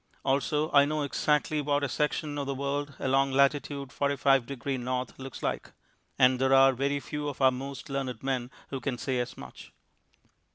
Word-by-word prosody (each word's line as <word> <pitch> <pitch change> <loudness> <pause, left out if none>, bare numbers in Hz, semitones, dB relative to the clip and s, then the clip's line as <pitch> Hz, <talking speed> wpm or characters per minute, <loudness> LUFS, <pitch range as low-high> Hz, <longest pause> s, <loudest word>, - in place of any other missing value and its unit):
Also 145 +3 +1
I 140 -1 +6
know 150 0 -1
exactly 150 +1 +1
what 145 0 0
a - - +1
section 150 +2 -1
of 140 - -3
the 140 - -2
world 140 +1 -3
along 135 0 +1
lat. 140 0 +6
45 140 -2 0
deg. 135 -4 -8
N. 130 -1 -1
looks 135 0 -8
like - - -3 0.4
and 130 -1 +4
there 135 0 +4
are 135 0 +6
very 140 +3 0
few 150 +1 -5
of 140 - -8
our 130 -1 +5
most 135 +3 -6
learned 135 -4 -4
men 130 -2 -1 0.2
who 135 - -3
can 125 0 -3
say 130 0 -1
as 120 0 -4
much. - - -11
135 Hz, 180 wpm, -28 LUFS, 130-145 Hz, 0.4 s, I